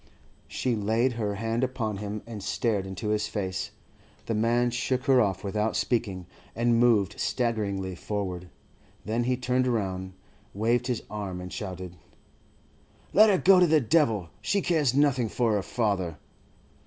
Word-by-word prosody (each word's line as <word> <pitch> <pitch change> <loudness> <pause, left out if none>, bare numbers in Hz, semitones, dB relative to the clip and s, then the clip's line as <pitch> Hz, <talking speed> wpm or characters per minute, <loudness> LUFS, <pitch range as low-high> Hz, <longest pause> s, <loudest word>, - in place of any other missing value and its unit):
She 125 -2 -1
laid 110 +4 +1
her 105 -3 -2
hand 115 +4 -1
upon 115 -5 -2
him 105 +1 -5
and 110 -3 -7
stared 100 -1 -1
into 95 +3 -4
his 105 0 0
face. 95 -4 -3 0.6
The 115 - -2
man 120 +3 +2
shook 125 +2 -1
her 130 -2 +5
off, 95 -3 0
without 105 +2 -1
speaking, 105 -7 -1 0.3
and 115 0 +2
moved 105 -5 +3
staggeringly 100 -6 -1
forward. 90 -1 -4 0.6
Then 115 +2 0
he 125 0 +1
turned 125 0 +1
round, 95 -5 -2 0.4
waved 120 +4 +1
his 125 -3 -2
arm, 100 -4 -5
and 90 0 -7
shouted: 90 -3 -6 1.2
'Let 215 +2 +7
her 195 - +4
go 185 +1 +6
to 180 - +5
the 155 -1 +5
devil. 115 - +1
She 200 - +1
cares 150 -9 +1
nothing 135 -5 +3
for 115 -1 +1
her 105 - +1
father. 95 -7 -1
110 Hz, 155 wpm, -27 LUFS, 100-125 Hz, 1.2 s, Let